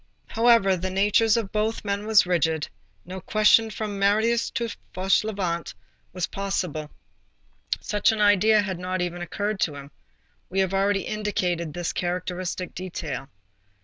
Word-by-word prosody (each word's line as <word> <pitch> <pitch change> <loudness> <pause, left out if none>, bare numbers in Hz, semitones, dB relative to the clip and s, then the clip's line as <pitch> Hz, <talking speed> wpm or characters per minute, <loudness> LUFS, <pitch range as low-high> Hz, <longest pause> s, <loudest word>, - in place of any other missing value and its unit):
However, 225 -4 +4
the 185 +1 -3
natures 210 +4 +3
of 220 -4 -3
both 215 +1 -1
men 200 +1 -2
were 220 - -3
rigid, 160 -3 0 0.4
no 185 +1 -7
question 215 +3 +4
from 210 -1 -5
Marius 220 +4 +2
to 235 - -3
M. 230 - -2 0.3
Fauchelevent 185 - 0 0.4
was 180 -1 -2
possible. 180 -6 -3 0.9
Such 210 +1 +1
an 220 - -3
idea 210 +1 +4
had 190 -4 -4
not 185 +1 -3
even 175 0 -3
occurred 205 +3 -3
to 150 -6 0
him. 140 0 -10 0.6
We 190 - -1
have 190 0 -1
already 195 0 +2
indicated 180 -6 -2
this 175 -1 -2
characteristic 180 0 -3
detail. 150 -7 -5
195 Hz, 145 wpm, -25 LUFS, 175-210 Hz, 0.9 s, However